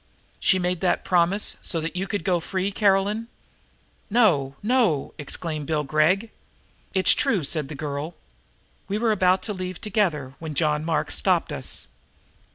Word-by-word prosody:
"She 190 - +3
made 180 -1 -1
that 185 - +1
promise 180 +3 +2
so 165 - -1
that 165 +2 -4
you 190 +2 -2
could 205 -4 -3
go 180 -1 +1
free, 190 +3 -2
Caroline?" 205 +2 +1 0.8
"No, 170 - +3
no!" 220 - +1
exclaimed 150 0 -4
Bill 155 -2 0
Gregg. 155 +10 +2 0.6
"It's 190 - +7
true," 190 -7 +1
said 150 0 0
the 150 - -6
girl. 145 +3 -4 0.7
"We 200 +1 -1
were 225 0 +1
about 185 -2 +3
to 210 - -3
leave 185 -2 -5
together 170 -11 -1
when 160 -2 -6
John 150 -1 +1
Mark 160 0 -1
stopped - - +1
us." - - -3
180 Hz, 155 wpm, -24 LUFS, 155-200 Hz, 0.8 s, It's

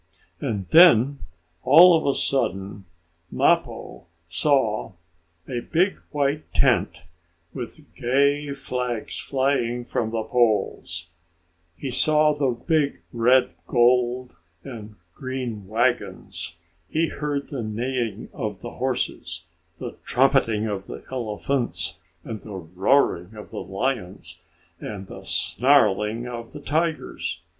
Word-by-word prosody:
And 100 -4 -3
then, 140 -5 +7 0.4
all 175 +1 +8
of 160 - 0
a 140 - +2
sudden, 100 -6 -1 0.5
Mappo - - 0 0.2
saw 110 - +1 0.5
a 125 -3 -2
big 175 +9 +1
white 145 +1 -1
tent, - - +2 0.5
with 130 +5 -7
gay 140 +3 +1
flags 125 -4 -3
flying 130 -3 0
from 115 -2 -1
the 110 -1 -2
poles. 105 -8 0 0.7
He 135 - -4
saw 150 +3 +4
the 145 -2 0
big 140 +4 0
red, 125 +2 +4 0.2
gold 125 +1 +2 0.3
and 110 -5 -9 0.2
green 130 -7 -5
wagons. 115 -7 -1 0.3
He 160 0 +1
heard 145 -1 -3
the 135 -4 -4
neighing 115 0 -3
of 105 -7 -4
the - - -7
horses, 120 -9 -2 0.3
the - - -7
trumpeting 125 -5 +2
of 100 -3 -4
the - - -8
elephants, 120 +1 -2 0.3
the 110 -2 -7 0.2
roaring 95 -2 +2
of 105 - -10
the - - -5
lions, 100 -1 -4 0.4
and 100 -2 -6
the - - -10
snarling 115 -3 +2
of 120 -1 -7
the 150 - -7
tigers. 160 +2 -2
125 Hz, 110 wpm, -24 LUFS, 110-140 Hz, 0.7 s, all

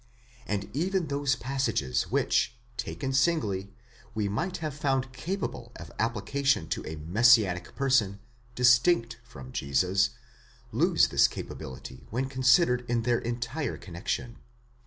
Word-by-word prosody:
And 100 -1 -2
even 180 +2 0
those 140 -1 +1
passages, 115 - -1
which, - - +1 0.2
taken 135 +2 -4
singly, 110 - +1 0.4
we 105 -2 0
might 160 - -2
have 155 -3 -4
found 135 -2 -1
capable 185 +9 -4
of - - -10
application 115 - 0
to - - -2
a 80 - -5
messianic 95 +3 +3
person, 125 -8 +2 0.4
distinct 125 -1 +4
from 65 - -11
Jesus, 90 +11 +1 0.6
lose - - +3
this - - +5
capability 65 -1 -8
when 125 +4 -1
considered 130 0 +3
in 120 -1 +1
their 120 0 +2
entire 120 +4 -3
connexion. 95 +6 -5
120 Hz, 120 wpm, -28 LUFS, 100-135 Hz, 0.6 s, this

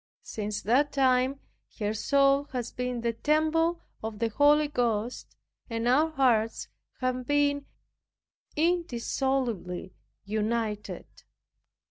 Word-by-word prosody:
Since 210 -1 -4
that 270 +7 +3
time 260 0 +2 0.4
her 210 -1 -1
soul 275 +5 +3
has 245 -2 -3
been 250 -1 -3
the 235 0 0
temple 315 +6 +1 0.2
of 220 -1 -5
the 230 +1 0
Holy 295 +5 +4
Ghost, 240 -4 -2 0.3
and 230 0 -2
our 295 +6 +4
hearts 245 -7 +1 0.3
have 255 -1 -1
been 285 -1 +1 0.9
indissolubly 265 - -1 0.3
united. 215 0 -2
250 Hz, 100 wpm, -28 LUFS, 225-285 Hz, 0.9 s, Holy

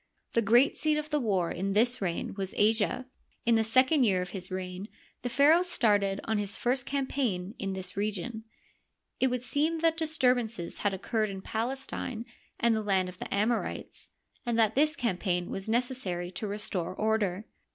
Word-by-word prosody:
The 230 - +3
great 240 +6 +4
seat 305 -1 +1
of 305 +1 -4
the 300 - +2
war 195 -8 0
in 195 +2 -2
this 240 +4 +3
reign 175 -3 -2
was 195 -1 -5
Asia. 220 +4 +2 0.4
In 235 - +4
the 225 -1 +4
second 255 +6 +4
year 195 -6 +3
of 180 - -7
his 185 -2 -4
reign 185 +1 -5 0.3
the 245 - -3
pharaoh 285 +7 +5
started 205 - +1
on 220 -1 0
his 205 -1 -3
first 250 +1 0
campaign 255 -9 -1
in 195 - -2
this 185 -1 -4
region. 215 +2 -2 0.8
It 260 - +4
would 250 -1 -2
seem 295 +6 +1
that 325 -1 +3
disturbances 250 - +1
had 205 - +1
occurred 215 +2 -1
in 195 -1 -7
Palestine 240 0 -3 0.3
and 235 -1 +3
the 220 - 0
land 190 -3 +1
of 180 - -12
the - - -6
Amorites, 220 +4 -1 0.3
and 240 -2 -1
that 220 -1 +4
this 305 +5 +3
campaign 180 - -1
was 195 +2 -4
necessary 225 -8 -1
to 210 +3 -5
restore 200 -4 -3
order. 215 -2 0
220 Hz, 175 wpm, -29 LUFS, 195-250 Hz, 0.8 s, pharaoh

